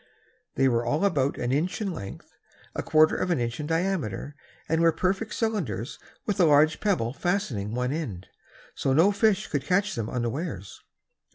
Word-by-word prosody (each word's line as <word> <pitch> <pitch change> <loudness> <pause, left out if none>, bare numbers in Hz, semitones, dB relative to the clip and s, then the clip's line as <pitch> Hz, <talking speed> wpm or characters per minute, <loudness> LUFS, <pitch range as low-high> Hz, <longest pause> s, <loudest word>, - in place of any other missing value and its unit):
They 135 +1 +3
were 120 -2 +2
all 150 +11 +1
about 140 -8 +1
an 120 - -1
inch 160 - 0
in 205 -3 -2
length, 100 -10 -9 0.4
a - - -2
quarter 155 0 +4
of 185 - -1
an 175 - +1
inch 120 +2 -2
in 150 - -3
diameter 165 - -1 0.3
and 160 0 +1
were 165 0 +5
perfect 190 +6 -1
cylinders 160 - -2 0.3
with 205 -2 -1
a 180 - +6
large 155 +1 +4
pebble 170 - 0
fastening 135 - -2
one 125 +1 0
end; 125 - -4 0.5
so 135 - 0
no 165 +8 +5
fish 210 0 +2
could 145 -3 -2
catch 200 +3 +1
them 115 -2 -3
unawares. 120 - -4
155 Hz, 175 wpm, -26 LUFS, 120-185 Hz, 0.5 s, a